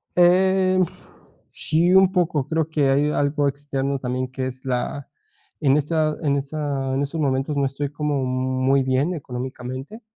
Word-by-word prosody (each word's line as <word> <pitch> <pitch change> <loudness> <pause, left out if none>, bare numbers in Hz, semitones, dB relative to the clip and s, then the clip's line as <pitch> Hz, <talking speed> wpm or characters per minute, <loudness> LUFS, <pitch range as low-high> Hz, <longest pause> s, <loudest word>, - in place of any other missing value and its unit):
Eh, 185 +1 +4 0.7
sí, 170 +4 +1
un 190 -1 +6
poco, 165 -7 +1
creo 160 -1 0
que 150 -4 +1
hay 145 +2 +3
algo 145 0 +1
externo 140 -1 -2
también 130 0 -3
que 130 0 -4
es 130 +1 -7
la 130 +2 -2 0.5
en 140 -1 +4
esta 155 +1 0
en 145 -3 +1
esta, 140 -1 -2
en 135 - 0
estos 145 +3 -2
momentos 135 +1 0
no 140 - +1
estoy 135 +1 -3
como 145 -2 -1
muy 130 +1 +1
bien 130 +6 +1
económicamente, 130 - -6
140 Hz, 155 wpm, -22 LUFS, 130-155 Hz, 0.7 s, un